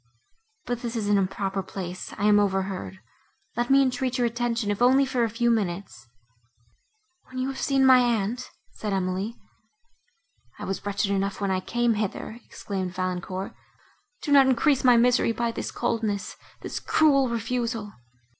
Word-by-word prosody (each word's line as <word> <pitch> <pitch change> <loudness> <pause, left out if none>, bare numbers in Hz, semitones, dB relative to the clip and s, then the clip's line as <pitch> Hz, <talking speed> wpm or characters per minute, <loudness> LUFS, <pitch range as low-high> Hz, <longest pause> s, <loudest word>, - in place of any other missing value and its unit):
But 245 -1 -3
this 235 -1 -4
is 215 -3 -2
an 205 -1 +4
improper 195 0 -1
place—I 185 0 -6
am 210 0 +6
overheard. 190 - -1 0.6
Let 240 +1 -1
me 275 0 +6
entreat 255 0 -1
your 245 - +2
attention, 235 -2 -1
if 205 - -3
only 265 +3 +5
for 255 -2 0
a 230 - +1
few 235 +2 +1
minutes."—"When 125 - -8
you 255 +1 -1
have 270 - -5
seen 270 -1 +3
my 260 -1 +8
aunt," 240 0 0 0.2
said 210 -2 -4
Emily. 190 +4 -2 1.2
"I - - -6
was 195 +1 -4
wretched 200 0 0
enough 195 0 -1
when 200 -1 -1
I 185 - +1
came 240 +4 0
hither," 215 +2 -4
exclaimed 185 -3 -5
Valancourt, 185 +1 -3 0.7
"do 295 - -2
not 275 -2 +7
increase 265 +2 +3
my 250 -2 +6
misery 240 -1 +3
by 235 0 -1
this - - -4
coldness—this 225 -4 -3
cruel 275 -4 +3
refusal." 230 -2 -2
225 Hz, 150 wpm, -26 LUFS, 195-245 Hz, 1.2 s, my